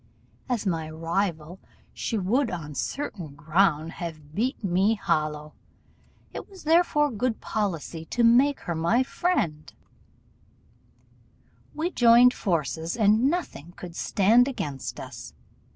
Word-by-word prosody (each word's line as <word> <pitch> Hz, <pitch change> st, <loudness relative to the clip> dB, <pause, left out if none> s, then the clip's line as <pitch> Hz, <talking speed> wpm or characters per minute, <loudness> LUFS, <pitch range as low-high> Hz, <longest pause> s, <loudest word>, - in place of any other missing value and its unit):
As 235 Hz, -4 st, -1 dB
my 165 Hz, -4 st, -2 dB
rival, 165 Hz, +1 st, -3 dB, 0.3 s
she 225 Hz, -, -3 dB
would 230 Hz, +7 st, +1 dB
on 160 Hz, -5 st, -6 dB
certain 175 Hz, -, -5 dB
ground 160 Hz, 0 st, +1 dB
have 155 Hz, -4 st, -8 dB
beat 235 Hz, -, -2 dB
me 195 Hz, +4 st, +2 dB
hollow; 150 Hz, -5 st, -2 dB, 0.8 s
it -, -, -7 dB
was 385 Hz, -2 st, -14 dB
therefore 315 Hz, -2 st, +3 dB
good 235 Hz, +1 st, -2 dB
policy 170 Hz, -6 st, -3 dB
to 235 Hz, +8 st, -1 dB
make 255 Hz, +5 st, +4 dB
her 170 Hz, -, -3 dB
my 170 Hz, +11 st, +2 dB
friend: 170 Hz, -, -1 dB, 2.0 s
we 330 Hz, +4 st, -2 dB
joined 240 Hz, -1 st, +6 dB
forces, 165 Hz, -, -2 dB
and 220 Hz, +4 st, +4 dB
nothing 235 Hz, -, -4 dB
could 175 Hz, -2 st, -10 dB
stand 225 Hz, +9 st, +3 dB
against 145 Hz, -, -5 dB
us. -, -, -9 dB
195 Hz, 120 wpm, -26 LUFS, 160-245 Hz, 2.0 s, joined